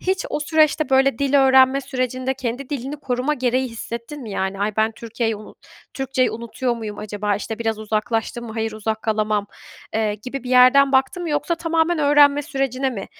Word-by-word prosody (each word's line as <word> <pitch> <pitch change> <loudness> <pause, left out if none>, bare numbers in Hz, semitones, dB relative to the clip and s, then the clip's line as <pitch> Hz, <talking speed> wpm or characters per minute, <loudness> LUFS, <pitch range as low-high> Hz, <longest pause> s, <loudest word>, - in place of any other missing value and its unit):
Hiç 375 0 -1
o - - -2
süreçte, 310 0 +2
böyle, 265 -2 +3
dil 280 0 0
öğrenme 265 +1 +5
sürecinde 255 -1 -2
kendi 255 +1 -4
dilini 275 +1 -4
koruma 270 +1 -1
gereği 255 0 0
hissettin 235 +5 -7
mi? 220 - -8
Yani, 190 0 -3
"Ay, 210 0 -1
ben 220 +1 +2
Türkiye'yi 225 -1 -3
unu 210 - -12 0.4
Türkçeyi 265 -1 0
unutuyor 235 +2 -3
muyum 215 -2 -6
acaba?" 205 -1 -2
İşte, 220 +1 -6
"Biraz 225 -2 -1
uzaklaştım 220 +2 -2
mı? 220 - -7
Hayır, 225 -1 -2
uzak 220 0 -3
kalamam." 215 -2 0 0.5
Eee, 215 -1 0
gibi 255 +5 -7
bir 250 - -5
yerden 255 +2 +6
baktın 265 +7 +2
mı 340 - -3
yoksa 295 +3 0
tamamen 330 0 0
öğrenme 290 0 +5
sürecine 270 -2 -1
mi, 200 -6 -6
255 Hz, 180 wpm, -21 LUFS, 220-275 Hz, 0.5 s, yerden